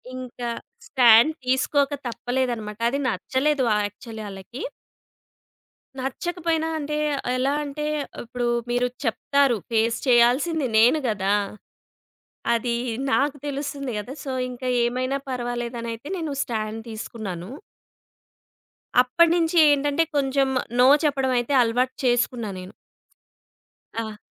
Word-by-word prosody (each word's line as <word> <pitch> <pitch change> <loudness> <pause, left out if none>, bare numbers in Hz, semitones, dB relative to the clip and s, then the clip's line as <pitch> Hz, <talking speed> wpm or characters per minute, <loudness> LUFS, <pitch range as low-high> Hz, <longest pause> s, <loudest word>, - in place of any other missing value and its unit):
ఇంకా 250 -1 -5 0.4
స్టాండ్ 245 +3 +6
తీసుకోక 270 +2 +2 0.2
తప్పలేదన్నమాట. 240 -3 -2
అది 280 +3 -2
నచ్చలేదు 260 +6 0 0.2
యాక్చువల్లీ 220 +2 -9
ఆళ్ళకి. 195 +7 -9 1.4
నచ్చకపోయినా 325 +4 -2
అంటే, 300 0 -3 0.4
ఎలా 270 +2 +1
అంటే, 295 +1 -4 0.4
ఇప్పుడు 240 +1 -3 0.2
మీరు 245 +1 +2 0.2
చెప్తారు. 275 +1 +2
ఫేస్ 225 0 +2
చేయాల్సింది 255 +5 +4
నేను 245 +8 +5
గదా! 200 -2 0 1.2
అది 235 +1 0 0.4
నాకు 285 +1 +2
తెలుస్తుంది 280 -2 -4
కదా! 245 +6 -6
సో, 270 - -3 0.2
ఇంకా 250 +1 -5 0.2
ఏమైనా 255 +3 -1
పర్వాలేదనయితే 240 0 -4
నేను 320 -4 -3
స్టాండ్ 220 -2 -3
తీసుకున్నాను. 210 -4 -6 1.5
అప్పటినుంచి 335 +6 +3
ఏంటంటే, 290 +2 +2
కొంచెం 275 -1 +2 0.3
నో 250 - +7 0.2
చెప్పడం 270 -3 +1
అయితే 240 +4 -2
అలవాటు 245 +3 0
చేసుకున్నా 240 -2 +1
నేను. 185 +1 -10 1.2
ఆ! 220 -2 -4
250 Hz, 100 wpm, -24 LUFS, 230-280 Hz, 1.5 s, నో